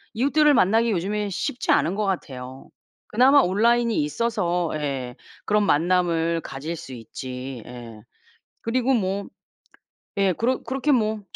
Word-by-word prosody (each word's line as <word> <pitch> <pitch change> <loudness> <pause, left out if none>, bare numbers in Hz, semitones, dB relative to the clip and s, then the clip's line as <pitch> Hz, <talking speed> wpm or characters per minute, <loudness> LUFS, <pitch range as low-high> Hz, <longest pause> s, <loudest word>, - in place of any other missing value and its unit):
이웃들을 290 +4 +4
만나기 225 +1 +3
요즘에 205 +3 -1
쉽지 240 +6 -2
않은 185 - +2
것 210 0 -1
같아요. 130 -8 -5 0.4
그나마 265 +5 +5
온라인이 230 +4 +2
있어서 175 0 -1
예 135 -5 -3 0.3
그런 210 0 +2
만남을 170 0 +2
가질 150 +5 -6
수 135 -5 -9
있지. 125 +2 -7
예. 120 -3 -10 0.6
그리고 255 +3 +1
뭐 200 -3 -1 0.9
예. 195 -2 +3
그러 250 +6 0
그렇게 270 +3 0
뭐 215 -3 +1
190 Hz, 270 characters per minute, -24 LUFS, 150-230 Hz, 0.9 s, 그나마